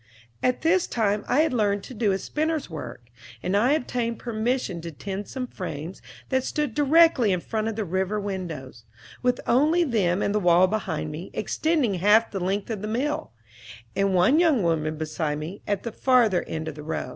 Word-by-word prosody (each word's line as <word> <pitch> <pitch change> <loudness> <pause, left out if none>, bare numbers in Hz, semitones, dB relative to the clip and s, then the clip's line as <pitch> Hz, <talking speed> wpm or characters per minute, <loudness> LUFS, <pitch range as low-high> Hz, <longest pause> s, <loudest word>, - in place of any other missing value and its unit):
At 250 0 +1
this 340 +2 +3
time 210 -2 0
I 270 +5 +3
had 315 -4 +1
learned 205 -4 +1
to - - -9
do 215 -3 +1
a 190 - +1
spinner's 310 - -2
work, 120 -6 -7 0.4
and 185 +2 0
I 240 +7 +4
obtained 240 -5 -1
permission 230 -5 -2
to 170 - -6
tend 195 +6 -6
some 260 -1 -4
frames 175 - -7 0.3
that 260 -1 +1
stood 295 -3 -2
directly 295 -5 +4
in 180 - +1
front 220 +4 -3
of 225 - -2
the 215 -1 -2
river 190 +4 -1
windows, 165 - -6 0.4
with 250 0 +1
only 305 +8 +3
them 205 - +1
and 200 - 0
the 210 - +2
wall 175 -1 +5
behind 185 -7 -2
me, 165 +5 -7
extending 295 0 0
half 210 +5 +4
the 195 - -3
length 195 +4 -2
of 210 -3 -4
the 210 - -4
mill, 255 - -2 0.6
and 195 -1 +1
one 185 - +4
young 310 - +3
woman 155 -2 0
beside 155 -1 -2
me, 160 +7 -7
at 205 -2 -1
the 230 - -4
farther 235 -6 +3
end 160 0 -4
of 160 - -4
the 150 - -9
row. 150 -4 -4
205 Hz, 195 wpm, -25 LUFS, 180-250 Hz, 0.6 s, wall